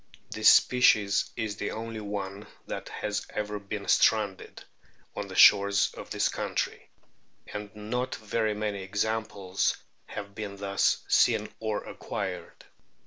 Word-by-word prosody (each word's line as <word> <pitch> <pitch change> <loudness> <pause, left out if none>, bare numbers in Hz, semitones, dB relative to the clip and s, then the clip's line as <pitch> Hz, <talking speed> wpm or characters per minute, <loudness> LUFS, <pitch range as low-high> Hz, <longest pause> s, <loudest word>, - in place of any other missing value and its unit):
This 110 0 +5
species 105 -5 +4
is 105 -2 -3
the - - -2
only 115 0 -5
one 100 -1 -5 0.2
that - - -6
has 105 -1 -3
ever 105 0 -3
been 100 0 -6
stranded 105 -4 +2 0.5
on 105 - -4
the 95 - -9
shores 100 0 +6
of - - -9
this - - +1
country; - - -3 0.6
and 105 0 -5
not 125 +5 -3
very 110 0 -1
many 105 -2 -3
examples 100 -1 -1 0.3
have 100 -1 -7
been 100 -1 -6
thus 100 0 +1
seen - - +3
or 110 -2 -2
acquired. - - -6
105 Hz, 130 wpm, -28 LUFS, 100-110 Hz, 0.6 s, shores